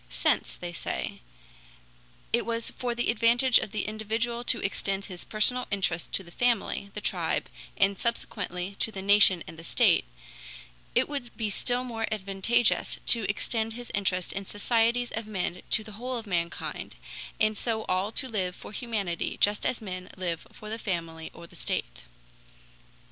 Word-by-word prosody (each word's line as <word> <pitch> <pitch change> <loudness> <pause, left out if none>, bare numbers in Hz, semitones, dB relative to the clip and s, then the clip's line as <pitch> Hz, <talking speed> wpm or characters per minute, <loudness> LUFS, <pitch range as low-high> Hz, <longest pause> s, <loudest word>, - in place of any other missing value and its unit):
"Since," - - +1
they 175 -1 -6
say, 160 - -3 1.1
"it 235 - +4
was 230 0 -1
for 245 -1 -3
the 240 -1 +2
advantage 235 +3 +5
of - - -4
the 215 - -2
individual 225 +3 -1
to 235 - +4
extend 195 0 0
his 180 -2 -8
personal 250 +4 +1
interest 180 -5 0
to 195 - 0
the 170 - -13
family, 230 -3 +1
the 210 - -3
tribe, - - 0 0.3
and 195 0 +3
subsequently 200 -5 -1
to 225 - +1
the 190 -2 -6
nation 200 -3 +6
and 160 - -10
the - - -9
state, - - +4 0.9
it - - +4
would 275 -5 -6
be 215 -2 -1
still 245 +5 +1
more 225 -3 -2
advantageous 215 +3 +2
to 230 -4 +5
extend 220 +2 0
his 245 +1 -7
interest 185 -3 0
in 195 - -3
societies 230 +4 +1
of 220 -1 -4
men 180 -3 -2
to 220 - +4
the 215 - -10
whole 245 +4 -3
of 225 - -5
mankind, 170 -4 -3 0.4
and 215 0 +3
so 220 0 0
all 185 +3 0
to 260 - +1
live 185 -6 -1
for - - -10
humanity 205 -6 -2
just 205 0 +4
as 235 - -2
men 185 -2 -5
live 175 -3 -3
for 215 - -11
the 225 - -3
family 165 -5 -3
or 170 - -11
the - - -16
state." - - -2
210 Hz, 170 wpm, -28 LUFS, 190-235 Hz, 1.1 s, nation